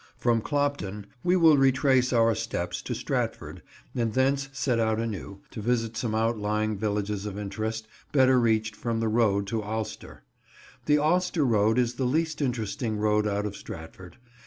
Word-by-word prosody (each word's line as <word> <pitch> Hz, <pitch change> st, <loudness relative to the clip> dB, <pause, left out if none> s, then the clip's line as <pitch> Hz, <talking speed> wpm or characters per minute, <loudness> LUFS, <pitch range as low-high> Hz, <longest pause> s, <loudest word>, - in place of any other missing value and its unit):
From 115 Hz, -2 st, +2 dB
Clopton 140 Hz, -8 st, -2 dB, 0.2 s
we 180 Hz, +1 st, +3 dB
will 165 Hz, -4 st, +6 dB
retrace 130 Hz, -1 st, +3 dB
our 115 Hz, -2 st, +4 dB
steps 100 Hz, -6 st, -3 dB
to -, -, -4 dB
Stratford, -, -, -3 dB, 0.3 s
and 115 Hz, -3 st, -1 dB
thence 135 Hz, +2 st, +1 dB
set 125 Hz, -2 st, 0 dB
out 110 Hz, -1 st, +1 dB
anew, 100 Hz, -3 st, -5 dB
to 110 Hz, -, -6 dB
visit 115 Hz, 0 st, 0 dB
some 110 Hz, -1 st, -2 dB
outlying 110 Hz, -1 st, 0 dB
villages 105 Hz, 0 st, -2 dB
of 100 Hz, -1 st, -6 dB
interest, 110 Hz, +2 st, -4 dB, 0.2 s
better 130 Hz, -2 st, +5 dB
reached 110 Hz, -2 st, +1 dB
from 115 Hz, -1 st, -2 dB
the 115 Hz, -, 0 dB
road 105 Hz, -3 st, +2 dB
to 110 Hz, +2 st, -2 dB
Alcester. 110 Hz, +1 st, -6 dB, 0.6 s
The 150 Hz, 0 st, +5 dB
Alcester 160 Hz, 0 st, +2 dB
road 110 Hz, -1 st, +3 dB
is 120 Hz, -1 st, +2 dB
the 130 Hz, -, 0 dB
least 155 Hz, +4 st, 0 dB
interesting 120 Hz, -3 st, -2 dB
road 105 Hz, 0 st, +2 dB
out 105 Hz, 0 st, -1 dB
of 105 Hz, -1 st, -4 dB
Stratford. 90 Hz, +1 st, -10 dB
115 Hz, 160 wpm, -27 LUFS, 105-130 Hz, 0.6 s, will